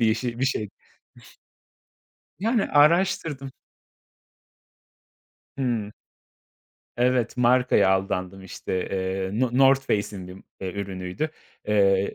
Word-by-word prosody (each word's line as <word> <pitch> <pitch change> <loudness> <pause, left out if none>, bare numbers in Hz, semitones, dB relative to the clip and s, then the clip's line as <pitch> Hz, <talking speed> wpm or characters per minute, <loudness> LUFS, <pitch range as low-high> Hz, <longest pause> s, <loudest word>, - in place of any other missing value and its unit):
bir 110 -1 +4
ş 120 0 -4
bir 130 - +2
şey. 110 -7 -1 1.7
Yani, 225 +1 +1
araştırdım 150 -3 +2 2.1
Hımm. 115 -6 -1 1.1
Evet, 125 -1 +1
markaya 125 -4 +4
aldandım 95 0 -1
işte, 95 - -7 0.2
eee, 95 0 -2
no 130 -2 +2
Northface'in 125 -8 +2
bir, 90 - -9 0.3
eee, 95 -1 -4
ürünüydü. 95 - -4 0.4
Eee, 100 -2 +3
110 Hz, 90 wpm, -25 LUFS, 95-135 Hz, 2.1 s, bir